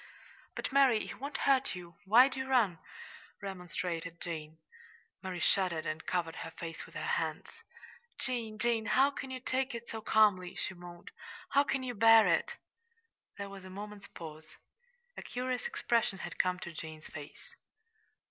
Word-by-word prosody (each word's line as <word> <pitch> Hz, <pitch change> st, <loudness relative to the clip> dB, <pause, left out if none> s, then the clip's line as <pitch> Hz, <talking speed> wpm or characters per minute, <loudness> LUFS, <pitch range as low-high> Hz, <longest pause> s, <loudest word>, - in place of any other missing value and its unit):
"But, -, -, -3 dB
Mary, 265 Hz, -5 st, +5 dB
he -, -, -6 dB
won't 280 Hz, +3 st, -5 dB
hurt 270 Hz, -5 st, +3 dB
you. 175 Hz, -1 st, -9 dB
Why 235 Hz, +7 st, +8 dB
do 265 Hz, -1 st, -5 dB
you 265 Hz, -, -3 dB
run?" 215 Hz, -10 st, +3 dB, 0.6 s
remonstrated 175 Hz, -3 st, -4 dB
Jane. 160 Hz, -2 st, -5 dB, 0.6 s
Mary 185 Hz, -2 st, -4 dB
shuddered 180 Hz, -5 st, +2 dB
and 155 Hz, +1 st, -4 dB
covered 170 Hz, -3 st, -1 dB
her 165 Hz, -, -5 dB
face 165 Hz, 0 st, -7 dB
with -, -, -17 dB
her -, -, -3 dB
hands. -, -, -1 dB, 0.7 s
"Jane, 230 Hz, -4 st, -1 dB
Jane, 230 Hz, -1 st, +1 dB
how 275 Hz, +2 st, +5 dB
can 265 Hz, -1 st, -6 dB
you 260 Hz, 0 st, -4 dB
take 260 Hz, 0 st, -1 dB
it 235 Hz, 0 st, -7 dB
so 225 Hz, -, -5 dB
calmly!" 205 Hz, -5 st, +4 dB
she 190 Hz, -, -2 dB
moaned. 175 Hz, -1 st, -11 dB, 0.4 s
"How 280 Hz, -, +5 dB
can 270 Hz, -2 st, -1 dB
you 250 Hz, -1 st, -3 dB
bear 225 Hz, 0 st, +8 dB
it?" -, -, +2 dB, 0.8 s
There 200 Hz, -1 st, -4 dB
was 195 Hz, -1 st, -9 dB
a 185 Hz, -, -9 dB
moment's 205 Hz, +1 st, -8 dB
pause. 155 Hz, -1 st, -9 dB, 0.7 s
A -, -, -5 dB
curious 250 Hz, 0 st, -2 dB
expression 230 Hz, -4 st, +1 dB
had -, -, -7 dB
come 180 Hz, 0 st, +2 dB
to 170 Hz, -, -6 dB
Jane's 160 Hz, -1 st, -8 dB
face. 150 Hz, -, -10 dB
200 Hz, 165 wpm, -33 LUFS, 175-250 Hz, 0.8 s, Why